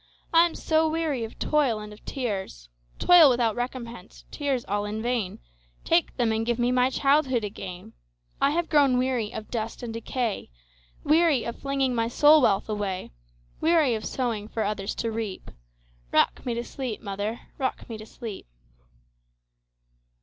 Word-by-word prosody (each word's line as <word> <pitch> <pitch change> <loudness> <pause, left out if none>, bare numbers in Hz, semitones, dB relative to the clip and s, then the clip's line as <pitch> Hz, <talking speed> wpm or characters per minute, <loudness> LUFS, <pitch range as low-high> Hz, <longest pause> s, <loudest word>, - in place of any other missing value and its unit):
I 335 +1 +7
am 335 - -9
so 315 0 +2
weary 310 -6 -1
of 225 - -7
toil 280 -8 +1
and 210 0 -8
of 210 - -16
tears,—Toil 195 - +2
without 240 -4 +2
recompense, 240 -4 -6
tears 275 -4 -1
all 205 +1 -1
in 210 +1 -4
vain,—Take 185 - -2
them, 235 -3 +2
and 220 0 0
give 235 0 0
me 240 0 +1
my 250 0 +3
childhood 270 -3 +2
again!I 145 - -5
have 330 +3 0
grown 280 -5 +4
weary 250 -4 0
of 215 - -8
dust 230 0 -4
and 230 -2 -4
decay,—Weary 230 - -1
of 235 - -5
flinging 275 -2 0
my 230 -1 +1
soul 295 +5 +6
wealth 200 -5 +2
away; 205 -3 -3 0.5
Weary 315 -6 +3
of 215 -1 -3
sowing 230 -5 -2
for 220 0 -2
others 200 -1 -2
to 230 - -2
reap;—Rock - - -3
me 235 - 0
to 235 - -2
sleep, 250 -4 -5
mother,—rock 215 +6 -4
me 225 -2 -7
to 215 - -9
sleep! 220 - -8
230 Hz, 145 wpm, -26 LUFS, 200-265 Hz, 0.5 s, I